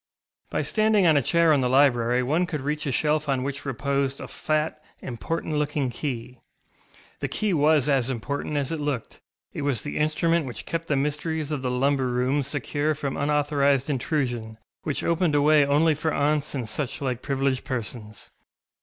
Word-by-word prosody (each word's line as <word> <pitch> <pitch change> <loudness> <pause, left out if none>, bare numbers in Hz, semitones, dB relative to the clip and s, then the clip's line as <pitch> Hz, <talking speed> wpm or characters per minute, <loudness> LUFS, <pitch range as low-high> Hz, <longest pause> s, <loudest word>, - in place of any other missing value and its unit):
By - - -1
standing 215 -3 +3
on 160 -2 +5
a 145 - +4
chair 165 +4 +3
in 140 - +3
the 125 - +1
library 125 -2 +3
one 160 +8 +1
could 155 -5 -3
reach 150 +2 -2
a - - 0
shelf 150 +2 +1
on 130 -2 +1
which 140 +1 -4
reposed 140 +1 -1
a - - -6
fat, 155 0 -1 0.2
important 150 +5 -3
looking 145 -3 0
key. 125 -2 -5 0.8
The - - -2
key 210 -3 -1
was 150 -2 +3
as 135 -3 +2
important 140 +4 -3
as 140 0 -1
it 160 -2 -3
looked; 145 -5 -3 0.3
it - - -4
was 140 -6 0
the 145 - -4
instrument 155 +1 +1
which 120 - -7
kept 165 0 -3
the 145 - +1
mysteries 150 +2 -1
of 145 -3 -2
the 130 - -1
lumber 135 +1 +1
room 125 +3 +1
secure 145 +2 -1
from 140 -2 -3
unauthorised 145 -1 +1
intrusion, 120 -5 -2 0.2
which 150 - -2
opened 170 -2 +1
a 145 - +4
way 150 0 +6
only 150 +3 +3
for 155 +2 -1
aunts 150 0 0
and 125 -4 -3
such 135 +3 -3
like 125 -2 -2
privileged 135 -1 0
persons. 115 -5 -5
145 Hz, 180 wpm, -25 LUFS, 130-155 Hz, 0.8 s, way